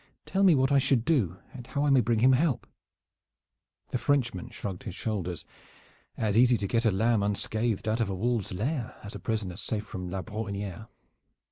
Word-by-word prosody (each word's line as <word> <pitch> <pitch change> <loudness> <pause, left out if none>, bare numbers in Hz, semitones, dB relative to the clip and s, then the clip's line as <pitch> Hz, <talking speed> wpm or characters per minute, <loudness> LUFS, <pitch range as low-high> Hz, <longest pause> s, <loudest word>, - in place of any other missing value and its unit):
Tell 195 - 0
me 185 -5 +7
what 135 0 +2
I 140 - +5
should 130 -3 +2
do 110 - +1 0.2
and 125 -2 -9
how 140 +2 -1
I 145 - +3
may 135 -2 +6
bring 115 0 +1
him 130 +2 +6
help." 140 -1 +1 1.2
The 125 - -1
Frenchman 120 -11 0
shrugged 95 -3 -6
his 90 - -7
shoulders. 90 -8 -3 0.7
"As 105 -2 0
easy 120 +1 +5
to 100 - -2
get 115 +3 +1
a 110 - +5
lamb 110 +3 +2
unscathed 110 +2 -1
out 110 +2 +1
of 115 -4 +1
a 95 - -2
wolves' 115 +1 -1
lair 120 - -2
as 100 - -7
a - - -6
prisoner 105 -5 -3
safe 110 0 -3
from 90 -3 -6
La 95 +1 -3
Brohiniere. 105 -2 -5
110 Hz, 195 wpm, -28 LUFS, 100-125 Hz, 1.2 s, me